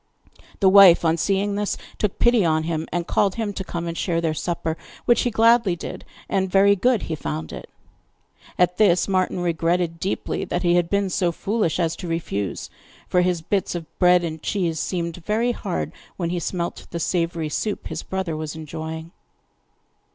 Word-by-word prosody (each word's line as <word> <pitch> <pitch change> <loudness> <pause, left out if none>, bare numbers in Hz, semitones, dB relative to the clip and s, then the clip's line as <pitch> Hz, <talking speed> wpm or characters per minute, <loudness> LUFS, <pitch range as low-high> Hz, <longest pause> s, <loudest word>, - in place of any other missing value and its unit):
The 195 - +5
wife, 190 -3 +8
on 165 0 +3
seeing 200 +3 0
this, 205 0 -1 0.2
took 210 -3 -1
pity 240 -3 +4
on 160 -2 +2
him, 160 -1 -2
and 175 -1 -1
called 195 +1 +1
him 220 -3 -2
to 190 - -4
come 170 -2 -4
and 170 0 -4
share 170 -1 0
their 165 -2 0
supper, 165 0 -2 0.3
which 240 -1 +4
he 245 - +1
gladly 230 -4 +4
did, 175 - -7 0.2
and 190 -1 0
very 200 +2 +5
good 240 +3 +2
he 165 - -4
found 80 - -4
it. - - -9 0.9
At 180 0 +2
this, 185 -5 +4
Martin 185 -2 0
regretted 170 0 0
deeply 190 - -2
that 175 - -2
he 175 -1 +3
had 175 -1 +2
been 200 -1 0
so 175 -1 +1
foolish 195 -1 -1
as 165 -1 +1
to 180 - -6
refuse, 130 - -3 0.4
for 180 - +3
his 180 -2 0
bits 195 +1 -1
of 170 -2 -4
bread 180 -1 +5
and 160 -2 -4
cheese 170 -5 -1
seemed 170 -2 -2
very 215 +7 0
hard 195 -6 -3 0.3
when 170 -2 -2
he 175 - -1
smelt 170 +1 -4
the 170 - -4
savoury 165 -2 -1
soup 210 +6 -3
his - - -4
brother 190 -4 -3
was 155 0 -5
enjoying. 160 +1 -6
175 Hz, 185 wpm, -23 LUFS, 165-195 Hz, 0.9 s, wife